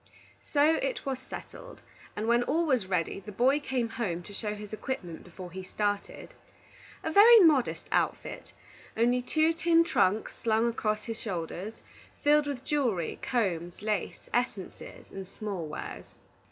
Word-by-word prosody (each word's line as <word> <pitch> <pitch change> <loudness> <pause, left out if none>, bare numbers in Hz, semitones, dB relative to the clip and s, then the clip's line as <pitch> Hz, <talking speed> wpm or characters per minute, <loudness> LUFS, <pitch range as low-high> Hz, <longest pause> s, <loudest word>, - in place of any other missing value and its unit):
So 300 +2 +4
it - - -2
was 265 -2 -2
settled, - - -10 0.3
and 215 +2 -3
when 235 +1 +4
all 330 +7 +1
was 255 -10 +1
ready, 180 -1 -1
the 200 +2 -9
boy 260 +8 +3
came 260 -5 -1
home 190 -7 -3
to 205 - -11
show 210 +1 -3
his 210 0 -9
equipment 205 -7 -5
before 180 0 -10
he 190 +2 -6
started. 205 +2 -3 0.7
A 320 - -1
very 450 +6 +9
modest 300 -8 +3
outfit, - - -1 0.5
only 245 +2 +3
two 315 +5 +2
tin 330 0 +4
trunks 215 - +1
slung 225 0 +2
across 215 -2 -1
the 230 - -3
shoulders, 195 0 -5 0.5
filled 295 0 +4
with 270 -3 -4
jewelry, 240 - 0
combs, 180 -7 -1
lace, 210 -4 -2
essences, 240 -6 -3
and 195 -1 -7
small 195 -5 -5
wares. 150 - -7
225 Hz, 150 wpm, -29 LUFS, 195-285 Hz, 0.7 s, very